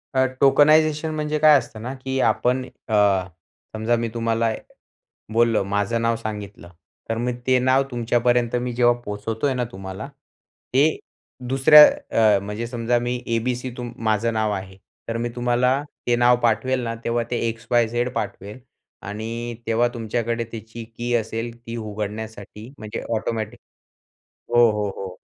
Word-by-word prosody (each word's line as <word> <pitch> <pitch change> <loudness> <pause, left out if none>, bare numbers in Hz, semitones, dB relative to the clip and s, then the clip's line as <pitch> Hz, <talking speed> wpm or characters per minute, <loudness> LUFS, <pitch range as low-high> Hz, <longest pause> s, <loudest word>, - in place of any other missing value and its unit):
अ, 130 0 +4 0.2
tokenisation 155 +2 +4
म्हणजे 150 0 -1
काय 155 -1 +7
असतं 110 -3 -6
ना 125 +3 -5
की 130 0 -2
आपण 125 +3 0 0.2
अ, 110 - -4 0.8
समजा 110 +2 +1
मी 115 0 -1
तुम्हाला 115 -1 0 0.8
बोललो 115 -3 +3
माझं 100 +3 -1
नाव 115 0 +1
सांगितलं 105 -5 -7 0.4
तर 115 - -1
मी 125 +1 -1
ते 130 0 +5
नाव 130 +2 +3
तुमच्यापर्यंत 120 0 +1
मी 125 -1 -3
जेव्हा 120 0 +4
पोहचवतोय 110 +6 -2
ना, 125 -1 -1
तुम्हाला 95 +6 -7 0.7
ते 145 +4 +3 0.5
दुसऱ्या 145 +3 +8 0.5
अ, - - +2
म्हणजे 105 +4 -5
समजा 120 0 0
मी 120 +1 -2 0.2
ए-बी-सी 125 +2 -2
तुम 120 -1 -5 0.2
माझं 115 +2 +1
नाव 110 -1 0
आहे, 95 -1 -6 0.3
तर 115 - -2
मी 120 +1 -2
तुम्हाला 125 +3 +1 0.3
ते 120 - +3
नाव 120 0 +5
पाठवेल 120 +3 +1
ना 115 0 -3
तेव्हा 120 0 0
ते 120 - 0
एक्स-वाय-झेड 120 +1 0
पाठवेल 105 +5 -5 0.5
आणि 115 +3 -5
तेव्हा 115 +2 +2
तुमच्याकडे 115 0 -2
त्याची 115 +1 -8
की 120 +1 -2
असेल 115 +1 -2
ती 115 - -6
उघडण्यासाठी 105 0 -6
म्हणजे 110 +1 -6
ऑटोमॅटिक 110 -1 -3 1.0
हो, 120 -1 +6
हो, 105 -1 -1
हो 95 -1 -5
115 Hz, 145 wpm, -22 LUFS, 110-125 Hz, 1.0 s, दुसऱ्या